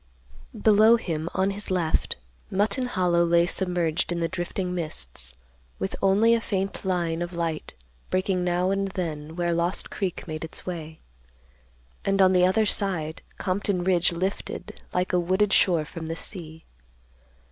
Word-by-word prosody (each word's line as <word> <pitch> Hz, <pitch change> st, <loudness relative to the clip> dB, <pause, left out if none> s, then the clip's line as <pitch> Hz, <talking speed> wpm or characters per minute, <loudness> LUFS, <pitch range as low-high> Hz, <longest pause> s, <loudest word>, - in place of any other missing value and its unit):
Below 215 Hz, +2 st, +6 dB
him, 165 Hz, -6 st, -3 dB
on 190 Hz, +1 st, +2 dB
his 205 Hz, +1 st, -6 dB
left, 175 Hz, -4 st, 0 dB, 0.3 s
Mutton 205 Hz, +6 st, +1 dB
Hollow 180 Hz, -6 st, +2 dB
lay 170 Hz, 0 st, +4 dB
submerged 175 Hz, -2 st, 0 dB
in 175 Hz, -, -1 dB
the 165 Hz, -, +1 dB
drifting 180 Hz, +1 st, -3 dB
mists, -, -, -3 dB, 0.4 s
with 95 Hz, -, -3 dB
only 205 Hz, +4 st, +5 dB
a 230 Hz, -, +2 dB
faint 195 Hz, -2 st, -2 dB
line 175 Hz, -3 st, 0 dB
of 175 Hz, +1 st, -3 dB
light 165 Hz, -, -3 dB, 0.3 s
breaking 185 Hz, -1 st, 0 dB
now 180 Hz, +1 st, +1 dB
and 195 Hz, 0 st, 0 dB
then 160 Hz, -5 st, -4 dB
where 175 Hz, -1 st, 0 dB
Lost 170 Hz, +3 st, -1 dB
Creek 190 Hz, -4 st, -3 dB
made 155 Hz, -1 st, -4 dB
its 160 Hz, -, -4 dB
way; 160 Hz, -3 st, -6 dB, 1.0 s
and 195 Hz, 0 st, +1 dB
on 190 Hz, -1 st, +6 dB
the 180 Hz, 0 st, +5 dB
other 215 Hz, +4 st, +3 dB
side 180 Hz, -7 st, -1 dB, 0.2 s
Compton 185 Hz, -1 st, -1 dB
Ridge 180 Hz, -2 st, +3 dB
lifted 185 Hz, +3 st, -4 dB
like 180 Hz, 0 st, -1 dB
a 180 Hz, -, +4 dB
wooded 190 Hz, +3 st, +2 dB
shore 170 Hz, -5 st, +4 dB
from 165 Hz, +1 st, -7 dB
the 165 Hz, -, -3 dB
sea. 160 Hz, -3 st, -4 dB
180 Hz, 155 wpm, -26 LUFS, 165-195 Hz, 1.0 s, Below